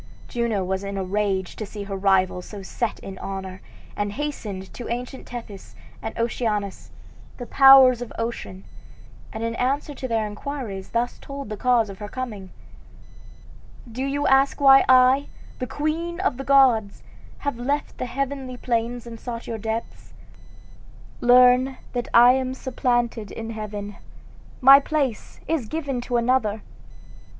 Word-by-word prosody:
Juno 235 -5 -1
was 190 +1 -2
in 200 0 -5
a 190 - -1
rage 190 -1 -1
to - - -4
see 205 0 -7
her 200 0 -5
rival 190 -2 +2
so 200 +2 -9
set 225 +3 -3
in 190 -1 -9
honor, 190 -1 -6 0.3
and 205 0 -2
hastened 210 -9 -5
to 245 - -7
ancient 245 +2 -5
Tethys 225 -5 -9 0.3
and 225 - -6
Oceanus, 220 -4 -2 0.5
the 245 - -6
powers 265 -2 +7
of 245 - -6
ocean, 230 -5 -5 0.7
and 220 - -5
in 230 0 -1
answer 275 +4 -1
to 260 -1 -5
their 225 -2 0
inquiries 210 -2 -6
thus 240 +1 -2
told 275 -4 -8
the 215 - -4
cause 240 0 +2
of 195 -1 -10
her 210 - -6
coming: 215 -5 -6 1.4
"Do 255 +4 -4
you 280 +1 -1
ask 270 +2 +3
why 270 -1 +7
I, 260 +2 +5 0.3
the 255 - -3
queen 325 +6 -3
of 385 -11 0
the 270 - -5
gods, 250 -7 +3 0.3
have 285 -5 -4
left 285 +4 -2
the 255 - -2
heavenly 265 0 -4
plains 240 0 -2
and 230 -1 -9
sought 235 -1 -6
your 225 -1 -5
depths? 220 +2 -5 1.1
Learn 250 +2 +5 0.2
that 245 -1 -2
I 240 +1 +8
am 260 0 -1
supplanted 240 -4 -1
in 225 +3 -6
heaven 210 -2 -6 0.6
my 270 +2 +9
place 280 -6 -2
is 310 -9 -1
given 280 -3 -3
to 245 0 -1
another. 230 -3 +1
240 Hz, 150 wpm, -23 LUFS, 210-265 Hz, 1.4 s, my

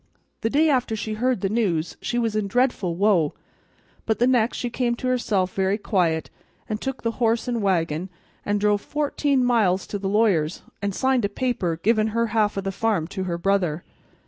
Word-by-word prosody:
The 225 - 0
day 300 +6 +3
after 255 -6 +1
she 215 0 -4
heard 245 -1 0
the 195 - +1
news 185 -7 0
she 240 - -2
was 225 -3 0
in 215 -2 0
dreadful 205 -6 +1
woe, 185 -5 +2 0.7
but 220 - +1
the 240 - +3
next 245 -2 +2
she 245 - -3
came 240 -1 0
to 255 - -4
herself 210 -7 0
very 195 +1 +1
quiet, 175 -7 0 0.4
and 215 -1 -3
took 265 -1 -4
the 230 - +1
horse 230 +1 +2
and 240 -2 -1
wagon, 175 -3 0 0.3
and 205 0 0
drove 205 0 +2
fourteen 285 -3 0
miles 205 -7 +2
to 205 - -5
the 195 0 -2
lawyer's, 195 -7 +1 0.2
and 200 -1 -2
signed 260 -2 +2
a - - -1
paper 205 -8 -1
givin' 220 0 +3
her 230 - +3
half 215 -2 +2
of 195 - -2
the 195 - -2
farm 205 -4 0
to 190 -1 -4
her 170 -2 -2
brother. 180 -3 0
215 Hz, 200 wpm, -24 LUFS, 190-240 Hz, 0.7 s, day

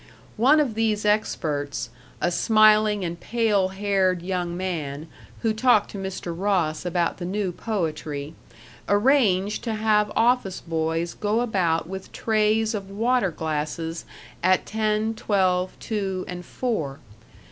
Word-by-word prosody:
One 270 +8 +5
of 275 -7 +1
these 215 -1 0
experts, 145 - -1 0.3
a 175 - +1
smiling 215 0 +4
and 170 0 -4
pale 215 -5 +1
haired 190 -2 0
young 175 -2 -2
man 155 -6 -3 0.4
who 225 -1 +2
talked 220 -1 +3
to 200 - -6
Mr. 190 -3 -5
Ross 180 -4 0
about 175 -1 0
the 175 - -5
new 195 0 -1
poetry, 155 -7 -3 0.6
arranged 205 -3 +3
to 225 -2 -1
have 210 -1 +2
office 230 -5 +2
boys 165 0 -2
go 215 +3 0
about 180 -9 0
with 190 +1 -7
trays 220 0 +1
of 200 -2 -5
water 225 +1 +1
glasses 160 +1 -3 0.4
at 185 -3 +3
ten, 215 0 0
twelve, 185 -4 0
two, 195 -4 -3
and 180 -1 -7
four. 160 - -2
195 Hz, 130 wpm, -24 LUFS, 170-215 Hz, 0.6 s, One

